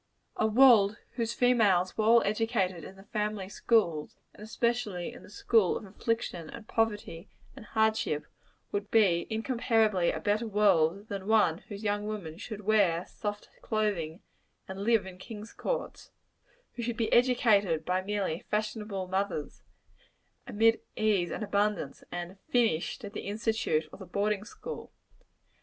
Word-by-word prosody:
A 220 - +2
world 220 -3 +6
whose 230 -1 -2
females 205 -8 +3
were 215 - 0
all 230 +1 +6
educated 205 -5 0
in 190 - -10
the 195 - -14
family 210 -1 -3
schools 190 -7 +1 0.2
and - - -16
especially 220 -4 -2
in - - -12
the - - -14
school 210 -1 +2
of - - -9
affliction, 195 -5 -3
and 225 - -10
poverty, 210 -6 -2 0.3
and - - -11
hardship 220 -9 +1 0.5
would 205 0 -3
be 190 -7 +3
incomparably 220 -5 +1
a - - -4
better 215 +3 0
world 200 -2 +2
than 195 -1 -5
one 205 -7 +3
whose 205 0 -7
young 205 0 -1
women 180 -6 -6
should 215 -1 -7
"wear 195 -5 +2
soft 205 -1 -6
clothing," 200 -6 -2 0.4
and 190 +1 -6
live 225 -3 +3
in 185 -1 -10
"kings' 215 +2 -9
courts" - - -4 0.6
who 240 - -6
should 235 0 -3
be 225 - 0
educated 210 -10 +3
by 185 +1 +1
merely 195 -4 -2
fashionable 210 -3 -2
mothers, 190 -5 -3 0.9
amid 225 -1 +3
ease 205 -5 +1
and - - -4
abundance, 205 -7 -1
and 175 +2 -6
"finished" 230 -1 +1
at 200 - -8
the - - -6
institute 210 -7 0
or - - -10
the 190 - -9
boarding 205 +2 -1
school. 475 - -8
210 Hz, 150 wpm, -29 LUFS, 185-225 Hz, 0.9 s, world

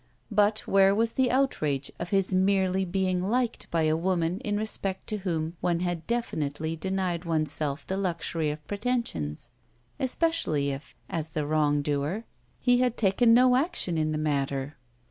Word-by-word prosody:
But 210 +1 +3
where 195 0 +4
was 225 +1 +1
the 260 0 +2
outrage 155 - 0
of 170 - -4
his 195 -1 +1
merely 190 0 +2
being 185 0 0
liked 235 +5 -1
by 165 -1 +1
a 155 0 +3
woman 175 +1 0
in 205 0 -2
respect 200 -3 -2
to 215 - 0
whom 170 -4 -2
one 170 -1 +1
had 175 -3 -2
definitely 160 -9 -2
denied 185 0 -2
one's 155 -4 0
self 150 -2 -2
the 190 - -2
luxury 170 -4 -1
of 150 0 -6
pretensions, 205 - -2 0.5
especially 260 - +1
if, 135 0 -8
as 160 -4 -3
the 150 -1 -2
wrong 145 -1 +2
doer, 150 +9 -1 0.4
he 245 -1 +3
had 250 -2 +1
taken 230 +3 +4
no 250 0 +6
action 270 - 0
in 155 -1 0
the 155 - -1
matter? 140 -1 -1
180 Hz, 165 wpm, -27 LUFS, 155-210 Hz, 0.5 s, no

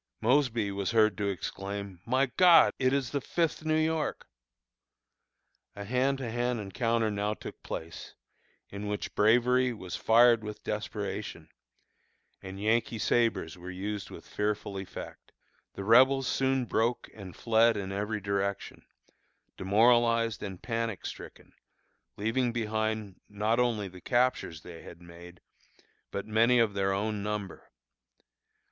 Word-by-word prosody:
Mosby 120 -4 +2
was 100 -1 -2
heard 110 -2 +3
to 100 - 0
exclaim, 100 0 -5
"My 130 +3 +3
God! 170 +5 +6
it 130 -1 +2
is 135 -3 -1
the 140 - -1
Fifth 165 0 -1
New 155 0 +1
York!" 160 0 -1 1.5
A 100 - -6
hand 130 +5 +1
to 125 -4 -5
hand 120 0 -1
encounter 110 +2 0
now 105 +1 -1
took - - -10
place, 80 0 -7 0.6
in 100 +1 -6
which 105 0 -4
bravery 125 +4 +3
was 95 -6 -7
fired 115 0 +5
with 105 0 -7
desperation, - - -5 0.9
and 95 0 -8
Yankee 115 +2 +1
sabres 110 -7 0
were 90 +1 -8
used 100 +2 -5
with - - -11
fearful 105 -1 -2
effect. 95 - -9 0.4
The 100 - -5
Rebels 130 +5 +5
soon 135 -1 +1
broke 115 +1 0
and 95 -4 -10
fled 115 -1 +3
in 95 -1 -4
every 105 +2 -3
direction, 100 0 -3 0.7
demoralized 115 +2 +3
and 95 -3 -6
panic 115 -3 -3
stricken, - - -9 0.6
leaving 115 +4 0
behind 110 -3 -2
not 105 +3 0
only 115 -5 +1
the 90 -1 -12
captures 120 - 0
they 85 -2 -10
had 85 - -12
made, 85 0 -14 0.7
but 100 - -5
many 115 +3 +3
of 115 -3 +3
their 95 -1 0
own 105 +1 -2
number. 105 -1 -5
110 Hz, 135 wpm, -29 LUFS, 100-120 Hz, 1.5 s, God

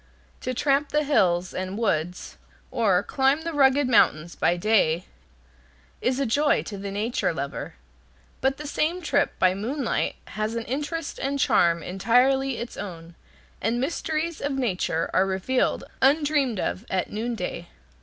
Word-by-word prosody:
To 255 - -3
tramp 280 +2 +2
the 300 0 +1
hills 185 -11 +2
and 185 +2 -4
woods, 180 -6 -1 0.4
or 205 -6 +2
climb 270 +6 +1
the 335 0 -3
rugged 275 -1 +4
mountains 170 -8 +3
by 175 - +1
day, 180 -4 +2 1.0
is 255 +1 0
a 275 - +1
joy 290 +6 +2
to 205 - -7
the 200 0 -5
nature 210 +1 -1
lover. 140 0 -5 0.7
But 270 0 +1
the 300 - -7
same 330 +5 -1
trip 285 -2 +1
by 185 0 +4
moonlight 240 +6 -2
has 215 +1 -3
an 230 - -2
interest 295 +4 -4
and 275 +1 -1
charm 170 - +3
entirely 250 +7 +2
its 235 +1 -6
own, 170 -4 -7 0.5
and 230 +4 0
mysteries 320 +3 -2
of 285 0 -1
nature 190 -10 -1
are 190 - +3
revealed 195 +7 0 0.2
undreamed 280 -5 +2
of 90 - -2
at 185 -1 -1
noonday. 210 -6 -4
235 Hz, 145 wpm, -25 LUFS, 185-280 Hz, 1.0 s, rugged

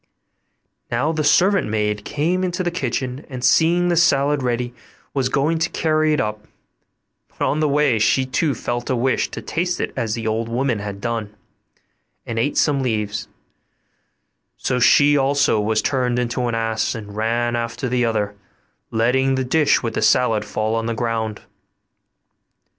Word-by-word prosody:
Now 125 +6 0
the 155 -1 -1
servant 190 +6 +3
maid 105 -1 -1
came 170 - -1
into 185 0 -1
the 175 - -1
kitchen, 130 -4 -3
and 130 -2 -7
seeing 170 +6 +3
the 175 - +2
salad 145 -3 +3
ready, 120 -1 -2 0.4
was 130 -2 0
going 155 +5 +1
to 170 +2 0
carry 155 -1 +1
it 150 - +1
up; 105 0 -3 0.8
but - - -4
on 150 - 0
the 155 -1 +2
way 140 -5 +2
she 120 +5 +2
too 140 +3 0
felt 120 0 -4
a 130 - +1
wish 130 +2 0
to - - -7
taste 175 +1 -2
it - - -3
as 110 -1 -1
the 115 -1 -5
old 110 +1 -1
woman 120 -1 0
had 100 -1 -6
done, 115 -3 -3 0.9
and 115 -1 -3
ate 140 +5 0
some 145 -3 +2
leaves; 105 -4 -2 1.3
so 125 - -1
she 145 +4 +5
also 140 -4 +2
was 110 +1 0
turned 125 -3 0
into 125 0 -1
an 120 - -1
ass 115 +1 -1
and 105 -2 -8
ran 120 +2 0
after 120 +3 -3
the 125 0 +1
other, 105 -3 0 0.6
letting 130 +4 +2
the 130 0 -1
dish 150 +2 +2
with 115 -1 -2
the - - -2
salad 115 -4 +3
fall 110 +1 -2
on 115 0 -1
the 115 - -2
ground. 110 -2 -2
125 Hz, 170 wpm, -21 LUFS, 115-145 Hz, 1.3 s, she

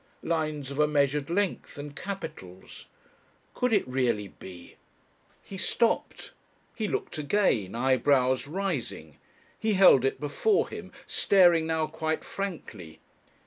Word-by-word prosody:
Lines 155 -4 -2
of 140 - -6
a 150 - +5
measured 145 -1 +1
length 195 -3 -2
and 145 0 -8
capitals! 155 - -8 0.7
Could 250 -1 0
it 205 -9 +2
really 120 -6 0
be? 90 -2 -12 0.7
He 195 - -9
stopped. 230 +4 -1 0.4
He 220 -3 -3
looked 175 - -3
again, 145 - +1
eyebrows 130 +1 +2
rising. 150 - -4 0.4
He 220 -1 +1
held 185 -9 +7
it 135 - 0
before 400 - +1
him, - - -8
staring 175 -5 +4
now 160 -1 0
quite 160 0 -3
frankly. 115 - -7
150 Hz, 120 wpm, -28 LUFS, 130-185 Hz, 0.7 s, held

